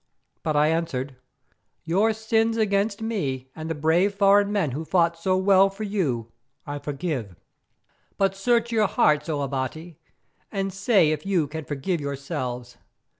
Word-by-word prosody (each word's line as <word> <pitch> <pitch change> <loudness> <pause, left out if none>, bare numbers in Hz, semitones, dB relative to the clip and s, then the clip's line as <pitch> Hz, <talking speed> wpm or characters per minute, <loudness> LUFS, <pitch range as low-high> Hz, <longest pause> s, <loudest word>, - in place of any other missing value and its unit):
But 155 - -1
I 150 +1 +4
answered: 145 -5 -2 0.7
"Your 195 +7 +2
sins 225 +1 0
against 205 0 0
me 135 - -3
and 160 0 -6
the 160 - -2
brave 170 +7 +2
foreign 200 0 +4
men 195 -9 0
who 145 +6 -4
fought 170 0 +2
so 185 +3 0
well 195 0 +5
for 195 +2 -7
you 140 - -2 0.3
I 145 0 -5
forgive, 140 - -4 0.8
but 195 -1 +1
search 235 +3 +1
your 215 -3 +3
hearts, 150 -3 +2
O 145 -2 -1
Abati, 140 +5 -4 0.5
and 195 -2 -2
say 195 -5 +3
if 155 -1 -2
you 190 -5 +1
can 160 +1 -6
forgive 150 +4 -2
yourselves? 130 -4 -5
170 Hz, 150 wpm, -25 LUFS, 145-200 Hz, 0.8 s, well